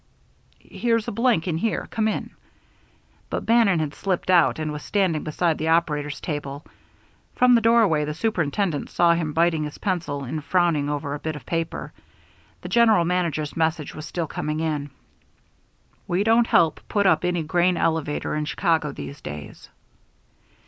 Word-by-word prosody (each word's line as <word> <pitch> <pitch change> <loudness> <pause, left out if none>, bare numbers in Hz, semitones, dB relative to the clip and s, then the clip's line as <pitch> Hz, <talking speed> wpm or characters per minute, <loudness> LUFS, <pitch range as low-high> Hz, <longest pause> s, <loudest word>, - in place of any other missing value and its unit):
"Here's 230 -2 -1
a - - -2
blank, 230 -6 +1
in 165 -2 -1
here. 225 +4 -1
Come 220 -1 0
in." 215 - -3 1.0
But - - -3
Bannon 225 -6 +4
had 155 -2 -2
slipped 185 -1 -1
out 175 -3 +4
and 155 -1 -3
was 150 0 -6
standing 185 -6 0
beside 160 +1 0
the 160 - -2
operator's 150 -3 0
table. 145 -2 -5 0.7
From 250 0 +5
the 235 - +5
doorway 225 -9 +4
the 150 0 -4
superintendent 175 -4 -1
saw 170 -1 +3
him 165 -2 -1
biting 165 -1 +2
his 150 - -7
pencil 170 -8 -2
and 150 +4 -5
frowning 165 -3 +1
over 145 -1 -3
a 145 - -4
bit 155 0 -4
of 150 - -10
paper. 165 -1 -3 0.7
The - - -7
general 225 -7 +4
manager's 170 -4 -1
message 160 -2 -1
was 155 0 -8
still 170 0 -3
coming 150 0 -3
in. 150 -3 -2 1.2
_We 180 +3 +1
don't 230 +2 +4
help 160 -2 +3
put 205 -1 +1
up 160 -4 +3
any 175 -2 0
grain 175 +3 +1
elevator 160 -3 -1
in 150 0 -1
Chicago 160 -2 0
these 140 +1 -8
days. 75 0 -9
165 Hz, 165 wpm, -23 LUFS, 150-185 Hz, 1.2 s, From